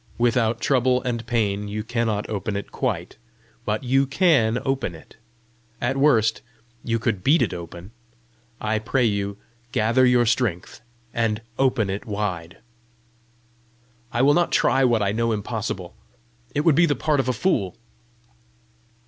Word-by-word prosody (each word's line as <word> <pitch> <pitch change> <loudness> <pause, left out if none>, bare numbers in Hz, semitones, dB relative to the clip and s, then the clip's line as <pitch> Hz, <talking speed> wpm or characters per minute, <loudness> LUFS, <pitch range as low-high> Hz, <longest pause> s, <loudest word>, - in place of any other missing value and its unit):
Without 120 -1 +2
trouble 130 -1 +2
and 120 -2 -3
pain 105 -4 0
you 105 +1 -4
cannot 115 -2 -1
open 105 -1 -3
it 100 - -5
quite, 100 -10 -3 0.5
but 105 +3 -1
you 135 +2 +2
CAN 140 -7 +3
open 135 -10 -1
it. 80 - -16 0.6
At 125 +2 -1
worst 135 -6 +3 0.4
you 115 -1 0
could 110 -5 -2
beat 150 +8 +4
it - - -2
open! 85 +2 -9 0.7
I 110 0 -1
pray 120 +3 0
you, 100 -2 -1 0.3
gather 115 +4 +2
your 125 -1 +4
strength, 110 -7 -1 0.3
and 115 -2 0 0.2
open 130 -5 +2
it 100 +3 -5
wide." 95 -5 -3 1.5
"I 120 - +1
will 145 +2 +5
not 175 +1 +2
try 135 - +3
what 120 -4 +3
I 100 - +1
know 115 +2 0
impossible. 105 -4 -4 0.6
It 145 - +2
would 160 0 +4
be 170 +4 +4
the 145 - +1
part 150 +2 0
of 130 -1 0
a - - +4
fool!" 115 - 0
115 Hz, 150 wpm, -23 LUFS, 105-130 Hz, 1.5 s, will